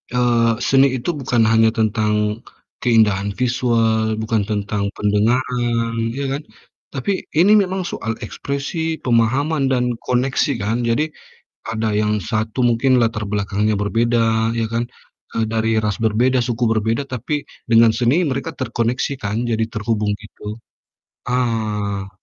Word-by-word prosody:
eee, 120 -2 +3 0.2
seni 135 0 +5
itu 125 +5 -3
bukan 125 -3 +1
hanya 115 0 +5
tentang 110 -1 +1 0.7
keindahan 105 -4 +3
visual, 115 -3 +1
bukan 110 0 0
tentang 105 -1 -1
pendengaran, 115 +2 +1 0.3
ya - - -2
kan? 145 - -5 0.5
Tapi 135 +8 -2 0.3
ini 190 +5 +6
memang 190 0 -3
soal 115 - -3
ekspresi, 140 +4 -4 0.2
pemahaman, 130 +6 +2
dan 125 -2 +2 0.2
koneksi 125 +3 +1
kan. 110 +3 0
Jadi, 115 +6 +2 0.7
ada 110 0 -1
yang 105 0 +1 0.2
satu 110 +2 -2
mungkin 120 +3 +1
latar 115 -1 0
belakangnya 105 +1 0
berbeda, 115 +1 +1
ya 115 - 0
kan, 115 - +1 0.6
eee, 115 - +2
dari 115 0 +1
ras 105 -3 0
berbeda, 120 +4 +2
suku 120 0 -1
berbeda 110 +3 0
tapi 125 +5 -3 0.4
dengan 115 0 +6
seni 120 +1 +3 0.2
mereka 135 +5 -3
terkoneksi, 120 +1 -1
kan, 105 +1 -2
jadi 115 -1 0
terhubung 105 -1 -1
gitu. 105 - -16 0.9
Ah. 105 -5 -1
115 Hz, 130 wpm, -20 LUFS, 110-125 Hz, 0.9 s, ini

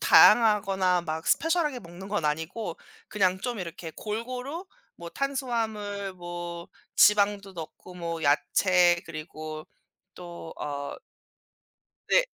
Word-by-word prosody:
다양하거나 195 -5 +6
막 160 0 -4
스페셜하게 320 -6 +2
먹는 175 +1 -10
건 205 -5 -1
아니고 160 +5 -2 0.3
그냥 190 -3 +2
좀 245 0 -3
이렇게 170 -2 -6
골고루 250 - -4 0.3
뭐 170 - -8
탄수화물 220 -7 -2
뭐 175 -1 -6 0.3
지방도 205 -1 +4
넣고 175 +1 -9
뭐 170 -2 -4
야채 175 +4 +4
그리고 155 -1 -7 0.5
또 175 -2 -9
어 140 -1 -4 1.1
네 - - +5
185 Hz, 225 characters per minute, -27 LUFS, 170-215 Hz, 1.1 s, 다양하거나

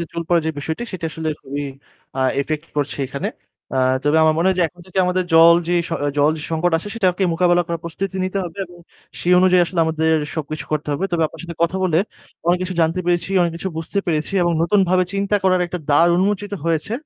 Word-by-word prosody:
যে 170 - -2
চুল 170 - -3
পড়া 170 -1 +4
যে - - +1
বিষয়টি 160 +8 -4
সেটা 170 -3 -4
আসলে 160 0 -4
খুবই 140 +1 -5 0.5
আ - - +1 0.2
ইফেক্ট 155 +2 -3
করছে 145 0 -2
এখানে। 140 +1 -4 0.5
আ - - 0 0.3
তবে 145 +2 +2
আমার 155 0 +4
মনে 170 - +2
হয় 190 - +1
যে - - +4
এখন 175 +3 -20
থেকে 185 +1 -4
আমাদের 180 0 0
জল 165 +1 +8
যে - - +1 0.5
জল 145 +2 +4
যে 150 - -7
সংকট 165 +2 0
আছে 205 - -7
সেটাকে 190 -4 +1
মোকাবেলা 175 +1 +3
করার 170 -1 -3
প্রস্তুতি 190 +3 -4
নিতে 190 +1 -2
হবে। 175 +3 -8
এবং 175 0 -16 0.4
সেই 180 - +2
অনুযায়ী 185 -1 +5
আসলে 170 -1 -1
আমাদের 160 0 +1 0.2
সবকিছু 155 -2 -4
করতে 155 0 -2
হবে। 160 +7 -2
তবে 165 - +1
আপনার 160 - -12
সাথে 170 -2 -8
কথা 170 +2 +1
বলে 165 -3 +2 0.5
অনেক 175 +1 +3
কিছু 185 0 -3
জানতে 165 +3 +1
পেরেছি, 175 +2 0
অনেক 170 -1 0
কিছু 190 - -4
বুঝতে 165 +5 -3
পেরেছি 155 +1 -1
এবং 175 0 +2
নতুন 200 +4 +3
ভাবে 185 0 +3
চিন্তা 200 +1 +1
করার 185 -1 +3
একটা 180 +1 -5
দ্বার 150 +4 +5
উন্মোচিত 205 +2 0
হয়েছে। 165 +5 -1
170 Hz, 220 wpm, -20 LUFS, 160-185 Hz, 0.5 s, জল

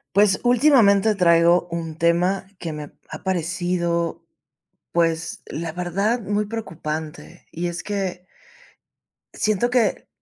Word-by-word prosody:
Pues, 200 -1 +4
últimamente 235 -5 +5
traigo 175 -2 +4
un 165 -2 -4
tema 180 +4 +1
que 165 - -5
me 150 -1 -8 0.2
ha - - -8
parecido, 170 -2 -1 0.7
pues, 165 -1 0
la 165 +1 -5
verdad, 195 +7 -1
muy 205 0 -1
preocupante, 160 -8 -6
y 175 +1 -2
es 175 -1 -5
que 190 -3 -4 1.1
siento 215 +3 +1
que 245 -2 +1
180 Hz, 110 wpm, -22 LUFS, 170-205 Hz, 1.1 s, últimamente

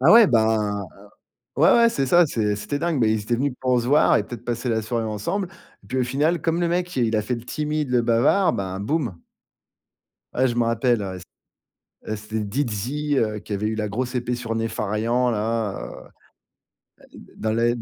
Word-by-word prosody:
Bah, 140 +6 +5
ouais, 230 -1 +9
bah, 110 - +1 0.7
ouais, - - +6
ouais, 235 0 +6
c'est 135 -11 -1
ça, 175 +5 +5
c'est 105 -7 0
c'était 145 +7 -3
dingue, 170 -3 0
bah, 115 - +4
ils 110 -1 +1
étaient 120 +3 -1
venus 135 +2 -1
pour 125 -2 +2
se 120 - -4
voir 145 +4 +5
et 105 - 0
peut-être 120 -1 -8
passer 120 +1 -3
la 110 -1 0
soirée 115 +1 -2
ensemble 110 - -2 0.3
et - - -19
puis 130 +6 -2
au 125 - +2
final 150 +7 +1
comme 165 +1 0
le 170 - +1
mec, 175 +1 -1
il 115 -3 +1
a 105 - +1
fait 125 +4 -2
le 115 - -8
timide, 150 0 -2
le 125 -1 +3
bavard, 120 +12 +3
ben, 95 -1 -3
boum. 120 - -2 1.2
Ouais, 130 +1 +3
je 120 - -2
m'en 120 -1 +2
rappelle, 115 0 +1
ouais, 95 -1 -5 0.9
c'é - - -5
heu, - - 0
c'était 110 +1 -4
Dizzy, 130 +6 -2
heu, 110 -2 0
qui 105 - -7
avait 105 +2 -1
eu 110 - -2
la 105 -1 -2
grosse 125 +5 -3
épée 125 0 -1
sur 115 -2 -4
Nefarian, 115 +2 0
là, 110 -1 -1 0.2
heu, - - -8
ah, - - -14 1.0
heu, - - -12
d - - -16
dans 110 0 -1
l'aide. 120 +1 +1
120 Hz, 215 wpm, -23 LUFS, 110-140 Hz, 1.2 s, ouais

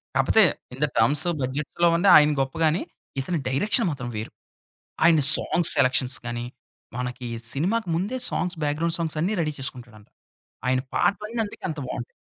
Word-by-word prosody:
కాకపోతే, - - +4 0.3
in 135 - -10
the 150 - +3
terms 145 +8 +3 0.2
బడ్జెట్‌లో 145 +6 -1
ఉండే 180 +4 +3
ఆయన 150 0 +6
గొప్పగాని. 155 +5 0 0.4
ఇతని 165 +5 -2
డైరెక్షన్ 205 - +2
మాత్రం 130 -4 -6
వేరు. 110 - -6 0.7
ఆయన 165 -2 +5 0.2
సాంగ్స్ 175 - +1
సెలక్షన్స్ 130 0 +2
గానీ, 120 0 -4 0.5
మనకి 125 0 -5 0.3
సినిమాకి 190 +9 -1
ముందే 200 +10 -2
సాంగ్స్ 180 -1 -2
బ్యాక్‌గ్రౌండ్ 155 +3 -1
సాంగ్సన్ని 165 +4 -1
రడీ 155 -2 -2
చేసుకుంటాడంట. 120 -5 -8 0.6
ఆయన 130 0 +2 0.2
పాటలన్నీ 210 +3 -1
అందుకే 205 - -12
అంత 155 -2 -5
బావుంటాయి. 120 - -6
150 Hz, 140 wpm, -24 LUFS, 130-175 Hz, 0.7 s, ఆయన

